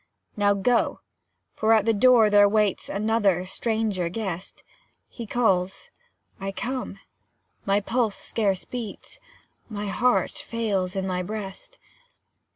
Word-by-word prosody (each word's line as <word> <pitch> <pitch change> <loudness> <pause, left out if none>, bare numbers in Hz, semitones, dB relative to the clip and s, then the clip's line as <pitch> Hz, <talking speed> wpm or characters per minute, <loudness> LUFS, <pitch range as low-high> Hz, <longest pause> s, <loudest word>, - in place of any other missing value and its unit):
Now 205 -1 +3
go; 230 +4 +1 0.5
for 220 +1 +2
at 215 -2 +3
the 225 - +3
door 225 -1 +5
there 205 0 +6
waits 210 -1 +1
Another 200 -3 +1
stranger 210 -3 -1
guest; 190 -2 -5 0.4
He 235 -3 -8
calls 195 -5 0 0.5
I 195 0 -3
come 245 -1 -4 0.7
my 200 +1 +2
pulse 225 0 0
scarce 200 -5 -1
beats, 245 - -7 0.5
My 210 -2 -4
heart 245 +5 +1
fails 200 -6 -2
in 190 -1 -1
my 180 -1 -1
breast. 215 - -7
210 Hz, 120 wpm, -25 LUFS, 195-225 Hz, 0.7 s, there